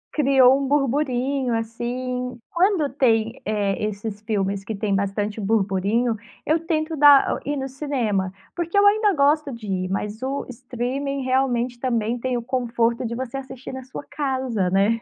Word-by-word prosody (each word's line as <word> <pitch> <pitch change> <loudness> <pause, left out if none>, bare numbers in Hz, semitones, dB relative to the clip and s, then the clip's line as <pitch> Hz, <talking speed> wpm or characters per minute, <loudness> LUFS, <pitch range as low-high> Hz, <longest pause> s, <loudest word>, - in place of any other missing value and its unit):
Criou 270 -2 +5
um 270 - -1
burburinho, 270 -2 +1
assim, 250 +2 -3
quando 350 -4 +2
tem, 230 -3 +1
eh, 205 -1 -1
esses 210 0 -4
filmes 200 -2 -1
que 215 +1 -4
tem 200 0 -1
bastante 205 +2 -2
burburinho, 210 +3 +1 0.3
eu 315 +2 +2
tento 315 -1 0
dar 290 -1 +6
ir 290 +1 -2
no 270 0 -3
cinema, 245 -9 -1 0.2
porque 345 +3 -2
eu 405 - +6
ainda 420 0 +5
gosto 285 0 +2
de 230 -3 -8
ir, 185 -2 -2
mas 210 +4 -3
o 270 +2 -2
streaming, 255 +3 -3
realmente, 255 -2 0
também, 235 -2 -1
tem 255 0 -1
o 235 - -4
conforto 235 -1 0
de 235 - -4
você 260 +1 -4
assistir, 265 -1 -8
na 260 0 -6
sua 260 +3 -8
casa 260 -9 -1
né? 205 +5 +2
250 Hz, 160 wpm, -23 LUFS, 220-275 Hz, 0.3 s, dar